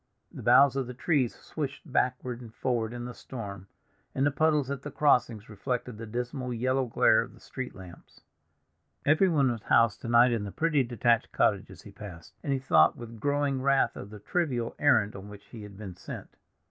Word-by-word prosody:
The - - -9
boughs 135 +3 +6
of 135 -2 -1
the 125 - -7
trees 130 -2 +1
swished 140 -3 -6
backward 125 -3 -1
and 115 -3 -10
forward 120 -3 -1
in 120 0 -6
the 125 - -6
storm, 100 -8 -8 0.5
and 135 - +2
the 145 - +3
puddles 150 -2 +1
at 140 -2 -4
the 145 - -6
crossings 120 -7 +2
reflected 120 +1 -4
the 115 - -7
dismal 125 +3 -4
yellow 130 +2 0
glare 115 - +4
of - - -8
the - - -18
street 130 -1 -7
lamps. 90 -3 -14 0.8
Everyone 155 -4 +3
was 115 -3 -5
housed 115 -1 +3
to - - -6
night 120 +1 +5
in 115 -3 -1
the 100 - -5
pretty 155 +1 +1
detached 120 -2 +1
cottages - - 0
he - - -12
passed, 90 -6 -11
and 140 - -3
he 135 - +2
thought 130 0 +4
with 115 -1 -9
growing 145 0 0
wrath 135 0 +2
of 100 - -8
the 105 - -10
trivial 125 - -2
errand 110 -9 +3
on 100 +1 -9
which 105 0 -12
he 115 - -10
had 105 -2 -11
been 100 -4 -8
sent. - - -9
125 Hz, 200 wpm, -28 LUFS, 110-135 Hz, 0.8 s, boughs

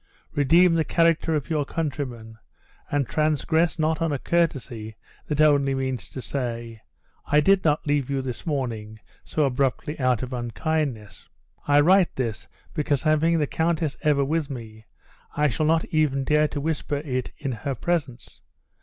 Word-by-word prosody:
Redeem 165 +5 +5
the 165 -1 +2
character 165 0 +2
of 145 -3 -2
your 150 -2 +1
countrymen, 130 -8 -5 0.5
and 145 -3 0
transgress 155 +2 +1
not 160 +1 0
on 165 -2 +1
a 145 - 0
courtesy 125 -9 -1 0.3
that 150 -1 -2
only 140 -3 +4
means 130 -3 -3
to 130 - -7
say, 115 -4 -4 0.5
I 150 - +4
did 195 +5 +4
not 150 -1 +1
leave 145 -3 0
you 135 -1 -1
this 125 -2 -5
morning 115 -7 -3 0.2
so 155 - 0
abruptly 135 +3 -1
out 130 -2 +1
of 130 0 -5
unkindness. 120 - -3 0.4
I 145 0 +5
write 180 +2 +4
this, 115 -5 -3 0.3
because 145 -3 0
having 160 +2 +3
the 150 - +2
countess 160 -1 -1
ever 145 -2 +2
with 155 0 -1
me, 110 -4 -9 0.5
I 150 0 +3
shall 145 +6 0
not 160 0 +2
even 150 -4 +1
dare 150 +2 +3
to 145 - -5
whisper 150 -1 -2
it 130 -3 -2
in 140 -3 -3
her 130 +4 -3
presence. 140 -3 -3
145 Hz, 160 wpm, -24 LUFS, 130-155 Hz, 0.5 s, Redeem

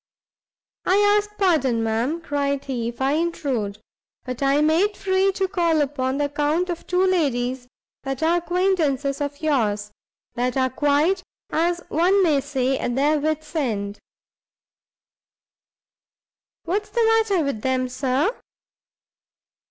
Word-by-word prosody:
"I 370 - +2 0.2
ask 415 0 -1
pardon, 275 - +2
ma'am," 235 +9 -1
cried 280 -2 -2
he, 245 -4 -3
"if 235 - -6
I 270 +1 +2
intrude; 280 -10 -1 0.5
but 255 0 -5
I 275 +1 +3
made 335 +7 +2
free 385 0 +2
to 385 0 0
call 340 -5 +1
upon 265 -2 -1
the 290 - +1
account 300 +5 0
of 340 - -7
two 365 +1 +2
ladies 260 -8 0 0.3
that 270 +2 -4
are 335 +2 +3
acquaintances 335 -7 0
of 285 +1 -4
yours, 210 -9 0 0.4
that 250 +2 -1
are 260 -1 +1
quite, 295 +7 +2 0.3
as 345 +2 +1
one 370 +5 +3
may 300 -5 +3
say, 270 -2 -1
at 240 - -2
their 295 +3 +2
wit's 310 +2 -3
ends." 210 -9 -2 2.6
"What 375 +5 0
is 410 - -20
the 470 -2 +1
matter 445 -6 +3
with 280 -7 -3
them, 260 0 0
Sir?" 265 - 0
290 Hz, 135 wpm, -23 LUFS, 260-350 Hz, 2.6 s, I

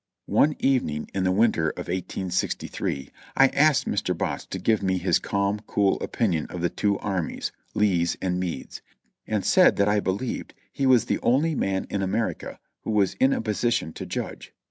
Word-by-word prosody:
One 150 0 +3
evening, 120 - 0
in 95 -1 0
the 95 - +3
winter 95 -6 +2
of - - -6
1863, 90 -6 -3 0.3
I 135 0 +7
asked 150 +1 +3
Mr. 90 -3 -1
Botts - - -3
to - - -5
give 110 -2 +1
me 95 -1 +1
his 90 +1 +2
calm, 100 +1 -1
cool 100 -1 +2
opinion 90 -10 -1
of 90 - -6
the 85 - 0
two 100 -1 0
armies 95 -5 -3 0.2
(Lee's 90 -5 +2
and 90 -1 -1
Meade's), 90 -2 -5 0.5
and - - -1
said - - +5
that 100 - +2
I 105 0 +3
believed 100 +6 -3 0.2
he 135 - 0
was 125 -3 +5
the - - -1
only 145 +7 +2
man 95 -8 -1
in 100 - -1
America 105 +4 -2 0.2
who - - -7
was 105 -3 +2
in 135 - +4
a - - 0
position 115 -4 -1
to - - -7
judge. - - -6
100 Hz, 180 wpm, -25 LUFS, 90-115 Hz, 0.5 s, I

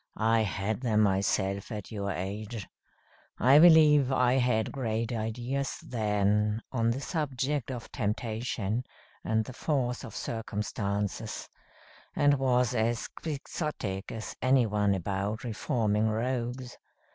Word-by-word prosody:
I 110 +1 +3
had 105 +1 -2
them 110 -4 +2
myself 100 0 +1
at 105 -1 -6
your 100 -2 -3
age. 100 +3 -4 0.7
I 135 +4 +6
believe 150 -5 +7
I 125 -1 +3
had 115 -3 +1
great 115 -3 -2
ideas 120 +5 -2
then, 105 -1 +1
on 115 -3 +1
the 120 +3 0
subject 140 -4 -2
of 125 -3 -6
temptation 110 0 -2 0.4
and 110 0 +1
the 130 - -8
force 130 -3 -1
of 115 -5 -9
circumstances; 105 -1 -3 0.7
and 145 -1 +4
was 125 -2 +2
as 115 0 0
Quixotic 140 - -4
as 110 -1 -6
any 130 -1 +4
one 105 -2 +1
about 100 +4 -2
reforming 110 -2 0
rogues. 120 +2 -3
115 Hz, 120 wpm, -29 LUFS, 105-130 Hz, 0.7 s, believe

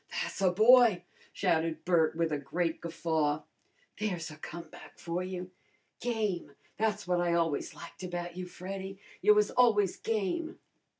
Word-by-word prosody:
"Tha's 475 - -3
a 190 - +5
boy!" 220 -1 +6 0.3
shouted 165 -3 0
Bert 165 -3 +3
with 165 -1 0
a 150 - 0
great 160 +4 -2
guffaw. 160 -3 0 0.6
"There's 180 -7 -2
a 155 - -11
comeback 165 +1 -10
for 170 +1 -3
you! 185 0 -5 0.5
Game! 210 -11 -2 0.2
Tha's 220 -4 0
what 180 -1 +2
I 175 -1 +1
always 165 -4 0
liked 170 - -11
about 175 -1 -4
you, 180 0 -5
Freddy. 190 +2 -6 0.2
You 210 - +6
was 210 0 +3
always 215 -6 +4
game." 225 - -2
180 Hz, 145 wpm, -31 LUFS, 165-205 Hz, 0.6 s, boy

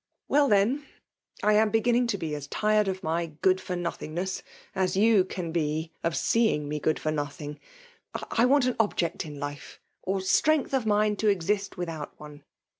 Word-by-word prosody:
*^ - - -63 0.2
Well, 285 0 +3
iheik, 210 +8 +3 0.6
I 210 - +4
am 215 +1 +4
beginning 235 +2 +2
to 220 -4 -1
be 160 -4 -4
as 145 -1 -5
tired 215 +4 +2
of 190 0 -3
my 165 +2 -1 0.2
good 185 0 +4
for 180 - -4
nothingness 175 +1 -3 0.3
as 190 0 0
you 215 -1 +5
can 180 -2 -5
be 160 0 -1
of 165 -1 0
seeing 220 -11 +2
me 150 +1 -3
good 155 +2 +1
for 155 - -2
nothing 150 0 -4 0.3
— 455 - -9
I 235 - +3
want 275 0 +4
an 255 - 0
object 190 -8 0
in 145 -2 -8
life, 145 0 -7 0.2
or 190 +1 -1
strength 295 +10 +2
of 255 -5 +1
mind 210 0 +2
to 220 - +1
exist 200 +1 0
without 165 -4 -5
one. 150 -1 -11
190 Hz, 190 wpm, -27 LUFS, 155-215 Hz, 0.6 s, you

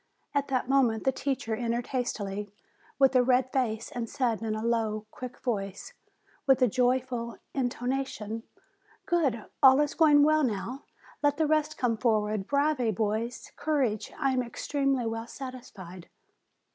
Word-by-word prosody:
At 285 -1 +1
that 255 -2 -1
moment 250 -5 +2
the 265 - +3
teacher 265 -3 -2
entered 235 +1 -1
hastily, 210 -5 -3 0.5
with 270 -1 +4
a 255 - +7
red 255 +1 +2
face, 230 -4 -1
and 235 -2 -4
said, 245 -6 0
in 220 -1 -2
a 215 +1 -3
low, 220 -2 0
quick 250 -1 -8
voice, 195 -6 -4 0.5
with 265 -2 +5
a - - +6
joyful 245 0 0 0.2
in 260 -3 +1
tonation: 245 -4 -3 0.6
"Good, 275 -11 +1 0.2
all 265 0 +8
is 295 0 +1
going 295 -3 +6
well 310 +1 +4
now, 245 +3 -3 0.4
let 290 -1 +2
the 315 - +2
rest 310 0 +1
come 235 -3 +1
for 220 -1 +3
ward; 210 -1 -3
bravi, 280 -4 +1
boys! 220 +3 -2
Courage! 265 -9 0
I 275 -3 +1
am 255 -1 +1
extremely 270 +1 -1
well 225 0 -3
satisfied." 235 -10 -9
250 Hz, 155 wpm, -28 LUFS, 225-270 Hz, 0.6 s, all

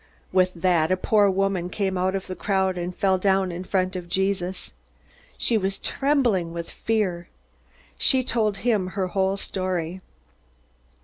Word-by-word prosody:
With 185 -1 +2
that, 170 -1 +2
a 185 - +3
poor 205 +1 +3
woman 190 -2 0
came 190 0 -1
out 185 +1 0
of 190 - -3
the 185 - -6
crowd 190 -2 0
and 175 0 -4
fell 190 -1 +2
down 190 -1 +2
in 175 +1 -5
front 185 0 -1
of 175 -1 -6
Jesus. 190 0 -1 0.6
She 230 -2 +1
was 195 0 -2
trembling 240 - 0
with 170 0 -6
fear. 190 -6 -1 0.7
She 260 -2 +5
told 220 -5 0
him 210 -6 +2
her 185 -2 0
whole 190 +1 0
story. 185 -2 -3
190 Hz, 150 wpm, -24 LUFS, 180-200 Hz, 0.7 s, She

